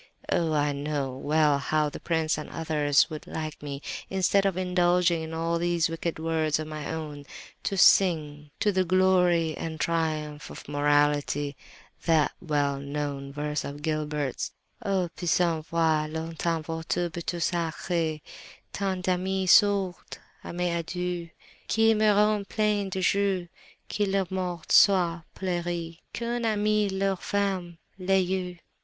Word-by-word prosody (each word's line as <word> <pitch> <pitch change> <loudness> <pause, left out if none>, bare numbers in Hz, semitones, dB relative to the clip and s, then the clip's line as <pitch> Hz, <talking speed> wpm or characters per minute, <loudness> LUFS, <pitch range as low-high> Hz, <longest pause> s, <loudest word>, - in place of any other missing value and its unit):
Oh! 165 -2 +1
I 145 -1 +2
know 140 -1 -2
well 150 +1 +2
how 150 +2 +1
the 145 - -7
prince 160 -2 0
and 150 - -6
others 150 -3 +2
would 155 - -7
like 155 -1 -5
me, 140 -1 -6 0.3
instead 195 +1 +2
of 190 -2 -1
indulging 180 -2 +2
in 160 0 -6
all 165 +1 0
these 170 -1 +1
wicked 165 0 -3
words 160 -1 0
of 155 - -4
my 155 -1 -5
own, 150 -3 -5 0.4
to 195 - -2
sing, 150 -6 +4
to 210 - +3
the 185 -1 +2
glory 180 -3 +3
and 160 -1 -5
triumph 155 -3 -1
of - - -10
morality, 145 0 +1 0.5
that 160 -3 +3
well 145 -4 0
known 140 -1 -4
verse 150 +1 -2
of 145 +1 -7
Gilbert's: 150 -3 -2 0.3
"'O, 190 -3 +1
puissent 170 -2 +1
voir 160 -2 +2
longtemps 160 0 -3
votre 165 +2 -2
beauté 170 +1 -4
sacrée 165 -2 -1 0.5
Tant 190 -2 -2
d'amis, 190 +1 0
sourds 200 -3 +3 0.3
à - - -6
mes 175 0 -1
adieux! 175 0 -4 0.4
Qu'ils 225 0 +4
meurent 210 -1 +3
pleins 210 -2 +1
de 190 - -2
jours, 195 -1 +1 0.4
que 205 - 0
leur 195 -2 0
mort 180 -3 -3
soit 175 -4 +5
pleurée, 175 -2 -3
Qu'un 235 0 -3
ami 210 -1 +2
leur 195 0 0
ferme 190 -4 -1 0.2
les 190 +1 +2
yeux! 180 -1 -3
170 Hz, 140 wpm, -27 LUFS, 155-185 Hz, 0.5 s, soit